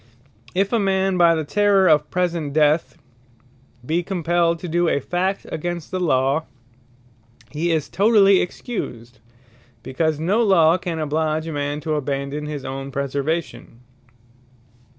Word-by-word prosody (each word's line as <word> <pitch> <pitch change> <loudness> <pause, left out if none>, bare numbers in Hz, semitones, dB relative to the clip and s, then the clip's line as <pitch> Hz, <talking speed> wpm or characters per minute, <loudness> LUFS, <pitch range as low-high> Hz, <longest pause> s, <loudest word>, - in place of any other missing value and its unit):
If 195 +4 0
a 230 - +3
man 195 -1 +1
by 170 -2 +5
the 160 - -2
terrour 200 +3 +3
of 150 -2 +3
present 170 -5 -2
death, 155 +2 +2 0.9
be 165 +5 0
compelled 170 -2 0
to 180 - -5
doe 175 +1 +1
a 140 - +1
fact 185 +6 -2
against 175 0 -4
the 185 - -2
Law, 140 -2 +1 1.1
he 165 +3 -1
is 155 -3 0
totally 200 -1 +4
Excused; 120 - -6 0.6
because 155 +3 -1
no 190 +8 +1
Law 180 -5 +4
can 175 -3 -4
oblige 155 +1 -1
a 165 - -5
man 145 +1 -3
to 155 +1 -2
abandon 140 +1 -3
his 145 -3 -6
own 135 +1 -5
preservation. 140 -1 -4
160 Hz, 135 wpm, -21 LUFS, 145-180 Hz, 1.1 s, by